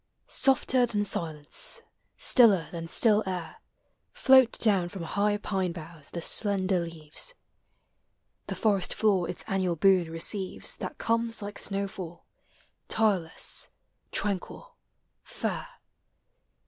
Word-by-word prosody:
Softer 260 -2 +2
than 205 -3 -1
silence, 155 -6 0 0.3
stiller 210 -9 +5
than 165 -1 -6
still 215 +4 +4
air 180 -3 -5 0.6
Float 265 - +5
down 195 -6 +2
from 190 -2 -7
high 205 +4 0
pine 190 -4 -2
boughs 165 -3 -6
the 170 - -4
slender 195 -3 +2
leaves. 165 - -4 1.1
The - - -4
forest 200 -4 +1
floor 195 -6 +2
its 180 - -5
annual 185 -3 0
boon 180 0 +3
receives 185 +4 -4
That - - -6
comes 230 -1 -1
like 205 0 -6
snowfall, 195 -4 -5 0.6
tireless, 195 -7 +1 0.4
tranquil, 205 - -4 0.5
fair. - - -4
195 Hz, 110 wpm, -28 LUFS, 170-215 Hz, 1.1 s, stiller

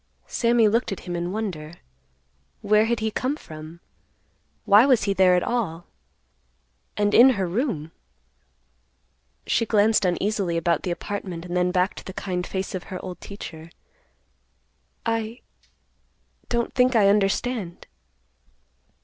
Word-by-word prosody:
Sammy 235 -2 +2
looked 230 +2 +1
at 195 - -5
him 175 -1 -5
in 175 +1 -3
wonder. 180 -7 -4 0.9
Where 210 +1 +4
had 235 0 -1
he 220 0 -1
come 260 +6 -1
from? 160 - -11 0.8
Why 205 +3 +7
was 255 -4 +4
he 200 -1 +1
there 185 -2 +5
at 180 - +1
all? 180 -9 -2 1.1
And 205 0 +1
in 250 +3 +8
her 190 - 0
room? 175 - -2 1.5
She - - +1
glanced 215 -1 +3
uneasily 185 -1 0
about 165 -1 +1
the - - -4
apartment, 180 -1 -5
and 175 0 -5
then 180 0 +2
back 180 +1 +1
to - - -10
the 190 - -8
kind 180 -2 -3
face 190 0 -4
of 185 -1 -5
her 185 -2 -6
old 180 -2 -8
teacher. 165 -5 -9 1.4
"I—don't 230 +1 -6
think 250 -1 +3
I 210 -3 +5
understand." 200 -1 0
195 Hz, 130 wpm, -24 LUFS, 175-225 Hz, 1.5 s, in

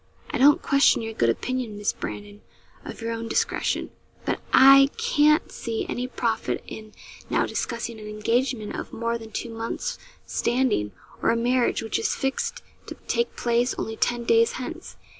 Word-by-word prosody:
'I - - -2
don't 290 +6 +6
question 275 -4 +4
your 225 0 -5
good 115 - +2
opinion, 240 - -2
Miss 205 0 0
Brandon, 205 0 -7 0.4
of - - -9
your 230 0 -2
own 230 0 -4
discretion; - - -1 0.3
but - - -1
I 275 +1 +8
can't 305 -10 +3
see 230 -2 -3
any 250 +1 -3
profit 230 -3 -2
in 215 -1 -10 0.4
now - - +2
discussing 235 -2 -4
an 210 - -9
engagement 220 +1 -1
of - - -6
more 230 +1 -2
than 225 -1 -11
two 235 +2 -4
months' 230 - -4 0.3
standing, 240 - 0 0.3
or - - +2
a 230 - +3
marriage, 245 +1 +1
which 225 - -1
is 445 - 0
fixed 470 - -2 0.2
to - - -7
take 470 0 0
place 240 +1 +1
only 220 - -3
ten 240 +1 0
days 230 0 +3
hence. 335 +7 -7
235 Hz, 165 wpm, -25 LUFS, 225-270 Hz, 0.4 s, I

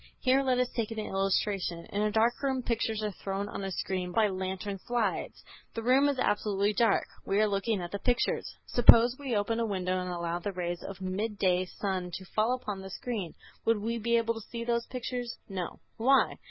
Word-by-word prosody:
Here 260 +1 +3
let 260 -2 +2
us 250 0 +2
take 225 -3 -1
an 225 - -6
illustration: 195 -3 -1
In 205 - -1
a 210 - +2
dark 225 +2 +2
room 265 -2 0
pictures 225 -2 -1
are 210 - -1
thrown 195 +1 -4
on 200 - -5
a 195 - -3
screen 185 -1 -2
by 215 +2 +3
lantern 190 +1 -3
slides. 240 +2 -2 0.3
The 230 - -3
room 265 +4 +5
is 280 - -1
absolutely 205 -4 +1
dark. 225 -1 +3 0.2
We 195 - +1
are 215 - +5
looking 200 0 0
at 175 - -6
the 200 - -3
pictures. 245 +1 0
Suppose 240 0 +7
we 265 -5 -2
open 220 +3 0
a 230 - +1
window 185 -2 -1
and 180 - -4
allow 170 -1 -2
the 200 +3 -4
rays 175 -1 -3
of 195 - -7
the 190 - -9
midday 185 -1 0
sun 185 -1 -3
to 190 - -7
fall 220 +6 +1
upon 205 -6 -5
the 190 - -8
screen. 205 -4 -4 0.3
Would 230 -1 +3
we 230 +3 -2
be 235 +2 +2
able 230 0 +1
to 225 - -7
see 235 -1 -4
those 235 0 0
pictures? 245 -1 -4
No. 185 -3 -5 0.2
Why? 265 +4 +4
210 Hz, 210 wpm, -30 LUFS, 190-235 Hz, 0.3 s, Suppose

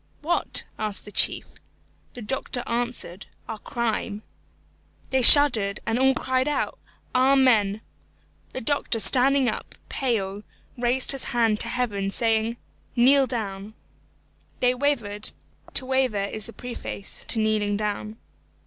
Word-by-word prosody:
"What?" 345 +3 +2 0.2
asked 210 -2 +1
the 210 - -10
chief. - - +2 0.7
The 245 - -8
doctor 245 +1 -3
answered, 235 -5 -2 0.2
"Our 220 - -6
Crime." 225 -4 -3 0.9
They 265 -1 +2
shuddered, 230 -7 +7
and 225 +2 -1
all 265 0 +3
cried 260 +1 -1
out, 295 - -2 0.3
"Amen." 255 -6 +3 0.7
The 260 - -5
doctor 280 -1 0
standing 265 +3 +2
up, - - -5
pale, 205 -6 -2 0.3
raised 245 +1 +4
his 275 -2 -2
hand 225 -3 +2
to - - -1
heaven, 230 -5 -2
saying, 225 +2 0 0.4
"Kneel 265 +3 +4
down." 210 -3 -6 0.8
They 250 0 +2
wavered 240 -7 -2 0.5
to 260 - -2
waver 260 -6 0
is 215 +1 -5
the 230 - -11
preface 240 -4 -8
to 225 - +3
kneeling 215 -2 0
down. 210 +1 -4
235 Hz, 125 wpm, -24 LUFS, 210-260 Hz, 0.9 s, shuddered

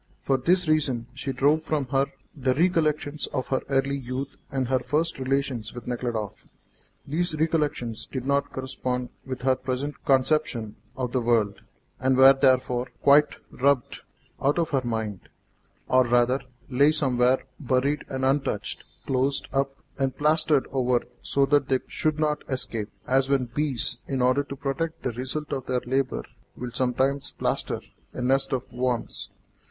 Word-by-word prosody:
For 135 - +2
this 180 +6 +2
reason 140 -7 +1
she 135 +1 -3
drove 145 +4 +3
from 155 -3 -1
her 135 0 +2 0.3
the 130 -3 +1
recollections 155 -3 +1
of 130 - -3
her 130 - +1
early 135 0 +1
youth 130 +1 -5 0.2
and 135 -2 -1
her 130 +1 +2
first 150 +5 -1
relations 130 -4 -1
with 120 - -8
Nekhludoff. 120 -4 -3 0.6
These 155 +1 -1
recollections 150 -8 0
did 130 -2 -5
not 140 +1 +1
correspond 130 -1 -3 0.2
with 130 -1 -5
her 130 0 +4
present 130 +3 -4
conception 130 -5 +1 0.2
of 125 -2 -2
the 130 - +1
world, 115 -4 +1 0.4
and 130 0 +2
were 135 +1 +9
therefore 130 -2 +2 0.2
quite 145 +1 +6 0.2
rubbed 140 -1 +1 0.4
out 140 +4 +2
of 165 -2 0
her 135 -2 +2
mind, 110 -4 -3 0.6
or, 130 0 +5
rather, 120 +2 +3 0.3
lay 140 +3 +4
somewhere 130 -4 +2 0.2
buried 140 +2 +1
and 130 0 -1
untouched, 135 -6 -1 0.2
closed 135 +1 0
up 135 0 0 0.2
and 135 -1 0
plastered 150 -1 +3
over 125 -2 +2 0.2
so 140 0 +2
that 140 0 +3
they 130 - +4
should 155 -1 -1
not 150 -1 0
escape, 115 -5 -2 0.2
as 135 +1 +2
when 135 -2 +2
bees, 135 0 -1
in 135 -2 -1
order 130 +3 +4
to 140 - -7
protect 145 +4 -3
the 125 - 0
result 130 +5 -4
of 130 -2 -4
their 125 -1 0
labour, 130 +1 -1 0.3
will 125 0 -5
sometimes 130 +3 0
plaster - - -1 0.3
a - - -5
nest 135 +2 +2
of 130 -3 -3
worms. 125 -1 -2
135 Hz, 155 wpm, -26 LUFS, 125-140 Hz, 0.6 s, were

